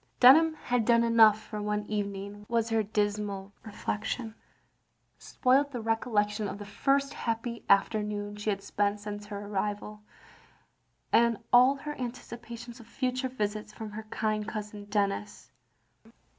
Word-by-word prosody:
Dunham 315 +6 +7
had 245 -5 0
done 235 +1 +4
enough 225 -2 +6
for 215 -1 -7
one 210 0 -1
evening, 205 0 -4
was 230 -1 +1
her 225 -1 +2
dismal 205 -1 -2
reflection. 220 +2 -4 0.9
Spoilt 270 +2 +2
the 245 - -4
recollection 220 -2 0
of 200 - -5
the 205 - -8
first 275 +7 +1
happy 230 0 -3
afternoon 205 0 +1
she 210 +1 -3
had 195 -1 -1
spent 205 +1 0
since 205 0 -7
her 205 -1 -6
arrival; 210 +1 -3 1.1
and 235 -1 +4 0.2
aU 250 +3 +7
her 295 +2 -6
anticipations 235 -1 -7
of 230 - -14
future 255 +1 -2
visits 210 -3 -3
from 220 -1 -7
her 215 +1 -8
kind 215 -1 -1
cousin 210 -1 -6
Denis. 205 0 -2
215 Hz, 135 wpm, -29 LUFS, 205-235 Hz, 1.1 s, Dunham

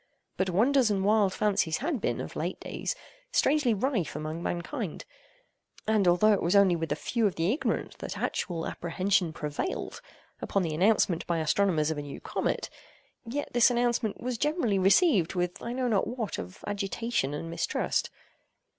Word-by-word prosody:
But 190 0 0
wonders 240 +6 +3
and 195 -2 0
wild 210 -2 +4
fancies 195 -6 +1
had 280 -4 -2
been, - - -1
of - - -7
late - - -3
days, - - -4 0.4
strangely 285 -3 +3
rife 210 - -1
among 155 +2 -4
mankind; 175 - -4 0.8
and, 215 -3 +2
although 195 +5 +5
it 200 - +1
was 175 +4 +1
only 195 -3 +6
with 165 -1 -3
a - - +2
few 230 -3 0
of 195 - -3
the 170 +6 +1
ignorant 300 - -2
that - - -5
actual 165 -3 -2
apprehension 185 0 0
prevailed, 150 - -4 0.4
upon 195 - 0
the 160 -2 -2
announcement 185 -1 +2
by 170 - +1
astronomers 160 -1 +2
of 155 - -3
a - - -3
new 145 -1 -8
comet, - - -2 0.6
yet 285 +5 -4
this 240 0 +6
announcement 240 -3 0
was 245 -1 -3
generally 295 - +1
received 195 - +4
with 180 +1 -2
I 235 - -4
know 255 0 -1
not 210 -5 +1
what 235 -4 -3
of 90 +1 -9
agitation 205 - -2
and 165 - -5
mistrust. 170 - -1
200 Hz, 170 wpm, -28 LUFS, 170-235 Hz, 0.8 s, only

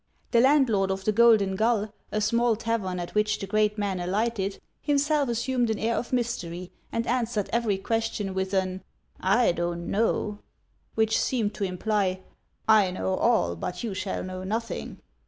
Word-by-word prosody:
The 235 - +5
landlord 255 -8 +4
of 190 0 -3
the 215 - +3
Golden 215 -3 +5
Gull, 220 0 +1 0.2
a 215 - 0
small 235 +2 +2
tavern 210 -5 -2
at 175 - -6
which 210 -1 +1
the - - -5
great 210 +2 +1
man 200 -3 -1
alighted, 200 +2 -1 0.2
himself 290 -1 +1
assumed 240 +1 0
an 220 - 0
air 225 +2 0
of 245 - -3
mystery, 185 -8 -2 0.2
and 230 0 -1
answered 235 -4 -1
every 230 -4 +1
question 220 -1 -2
with 190 0 -2
an 185 0 -1 0.2
" - - -34 0.2
I - - +4
don't 170 0 -3
know," 210 -1 0 0.6
which 220 0 +2
seemed 225 -5 0
to 200 - -2
imply, 190 0 -1 0.2
" - - -43
I 190 - 0
know 185 +1 -2
all, 215 - +2
but 180 - -5
you 225 -4 -2
shall 190 +1 -3
know 185 0 -6
nothing." 225 +4 -4
210 Hz, 175 wpm, -26 LUFS, 190-230 Hz, 0.6 s, The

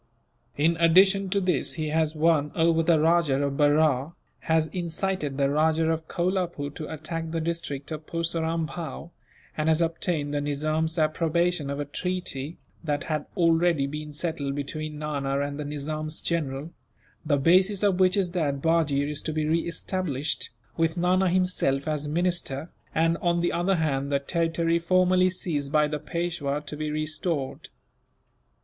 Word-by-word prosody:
In 165 +3 +2
addition 190 +4 +5
to 200 +2 +1
this, 180 -7 0
he 155 -2 -3
has 160 0 +1
won 155 -2 +2
over 165 -1 +3
the 165 -1 +3
Rajah 155 -4 +3
of 140 -1 -1
Berar, 145 0 +3 0.3
has 160 -1 +2
incited 170 -3 -2
the 140 -1 +3
Rajah 160 +2 +2
of 160 0 -3
Kolapoore 175 -5 -1
to 155 +1 -7
attack 160 +1 -4
the 165 0 -2
district 160 -3 -4
of 155 0 -6
Purseram 165 -1 -1
Bhow; 165 +1 -7 0.4
and 155 +1 0
has 160 0 +3
obtained 165 -3 -1
the 145 - 0
Nizam's 155 +3 -1
approbation 165 0 +1
of 140 0 -3
a 145 - -2
treaty, 165 -2 -4 0.3
that 145 -3 -1
had 155 -2 -3
already 165 -3 +3
been 150 +2 -5
settled 150 -2 -3
between 150 +2 -4
Nana 140 -2 -2
and 145 +1 -3
the 150 - -3
Nizam's 155 +2 -4
general, 150 -2 -2 0.5
the 150 -3 +2
basis 185 +7 +4
of 195 -3 +2
which 185 +1 +4
is 185 -3 +1
that 150 -6 -1
Bajee 150 -3 +2
is 150 0 -2
to 155 - -3
be 155 0 -1
re 165 +2 +1
established, 165 -4 -2 0.3
with 165 +1 +1
Nana 180 +2 +3
himself 175 -6 +1
as 150 -1 -1
minister 170 -2 -1 0.2
and, 165 +1 +2
on 170 0 +1
the 175 - +1
other 180 +3 +1
hand, 140 -4 -1
the 140 - +3
territory 165 +3 0
formerly 185 +1 +3
seized 150 -6 -2
by 150 -1 +4
the 150 0 -3
Peishwa 160 -3 -2
to 150 - -5
be 155 0 -3
restored. 155 -1 -3
160 Hz, 160 wpm, -26 LUFS, 145-170 Hz, 0.5 s, addition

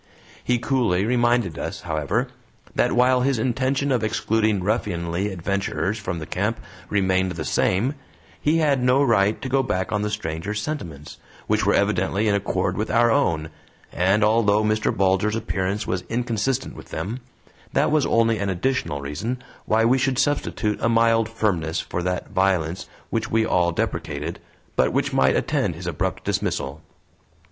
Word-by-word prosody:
He 125 - +2
coolly 115 -7 +1
reminded 120 - +1
us, - - -4
however, 90 - -1 0.4
that - - +2
while 125 +1 +4
his 135 0 +1
intention 130 +4 0
of 120 -4 +1
excluding 110 -2 +1
ruffianly 90 -2 -1
adventurers 100 +3 -2
from 90 -4 -4
the 80 - -5
camp 105 +8 -1 0.3
remained 95 -2 +1
the 80 -2 -5
same, 110 +10 +1 0.5
he 155 +2 +2
had 145 -5 +2
no 125 +3 +4
right 105 -5 +3
to - - -2
go 135 +1 +2
back 95 -7 -2
on 105 - 0
the 105 - -1
stranger's 105 0 -3
sentiments, 85 - -6 0.3
which - - +1
were - - +4
evidently 105 +3 +1
in 105 - +3
accord 95 -2 0
with 110 +1 -2
our 120 0 +4
own, 80 -7 +1 0.4
and 95 +4 +2
although 105 -1 +3
Mr. 110 0 +1
Bulger's 95 +3 +1
appearance 100 -1 -2
was 90 0 -2
inconsistent 120 +2 -1
with - - -12
them, 100 +10 -4 0.5
that - - +2
was 155 -2 +3
only 115 -1 +2
an 100 -1 -1
additional 90 - -1
reason 110 - -4 0.2
why 110 +1 +3
we 130 +3 +4
should 135 -1 +1
substitute 130 -7 0
a 115 - +2
mild 115 -1 +3
firmness 95 -8 -1
for 90 - -3
that 90 0 -2
violence 95 -3 0 0.2
which 115 0 -1
we 110 0 +2
all 85 -3 +2
deprecated, 80 -1 -3 0.4
but - - +2
which - - 0
might 65 0 +3
attend - - 0
his - - -8
abrupt - - -2
dismissal. 70 +3 -2
105 Hz, 160 wpm, -23 LUFS, 90-120 Hz, 0.5 s, while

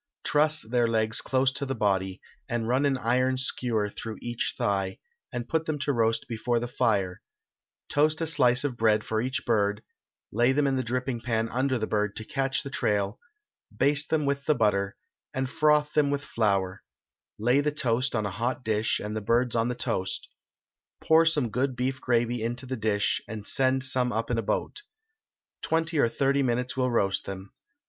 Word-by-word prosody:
Truss 150 +1 +2
their 120 +1 +1
legs 110 -1 +2
close 130 0 +1
to 140 +2 -2
the 135 -1 -2
body, 95 -4 0 0.3
and 115 -1 -1
run 130 +4 +2
an 135 -1 +1
iron 130 +2 +1
skewer 120 -4 -1
through 110 +1 -7
each 120 -1 -3
thigh, 95 -2 -1 0.3
and 120 0 -4
put 160 +3 -1
them 155 -1 -1
to 140 0 -1
roast 115 -2 +1
before 120 +1 -1
the 120 - -3
fire; 100 -6 0 0.7
toast 155 +2 +2
a 165 - 0
slice 130 -5 +3
of 135 -5 -2
bread 110 -1 +3
for 110 0 -1
each 130 +4 -3
bird, 105 -2 +1 0.5
lay 120 +4 +3
them 145 +1 +2
in 135 -1 +1
the 130 - +1
dripping 125 0 -2
pan 115 -2 0
under 130 +2 0
the 110 - -1
bird 105 -1 -1
to 110 - -6
catch 135 +2 -1
the 140 - -6
trail; 105 -5 0 0.6
baste 145 +1 +3
them 155 -2 +1
with 140 0 -1
butter, 105 -8 +1 0.4
and 130 -1 -2
froth 150 -1 +3
them 150 -2 +3
with 145 0 -1
flour; 100 -6 0 0.6
lay 125 +6 +3
the 150 +1 0
toast 125 -4 0
on 110 -2 0
a 100 - -2
hot 120 +6 -2
dish, 110 0 +1
and 105 +1 -5
the 110 - -2
birds 120 +3 +1
on 115 0 +2
the 125 - -2
toast; 95 -5 -2 0.7
pour 160 +1 +4
some 145 -8 +1
good 130 +3 0
beef 130 +2 -2
gravy 120 -1 +1
into 120 +3 -2
the 130 0 -3
dish, 105 -3 0
and 105 -1 -7
send 130 +1 +1
some 130 -2 +1
up 115 +1 -2
in 115 - +1
a - - +1
boat. 115 - -2 0.8
Twenty 160 -1 0
or 120 - +4
thirty 140 +3 +1
minutes 125 -1 -1
will 130 -1 +1
roast 100 -5 +1
them. 95 0 -7
120 Hz, 190 wpm, -27 LUFS, 110-135 Hz, 0.8 s, pour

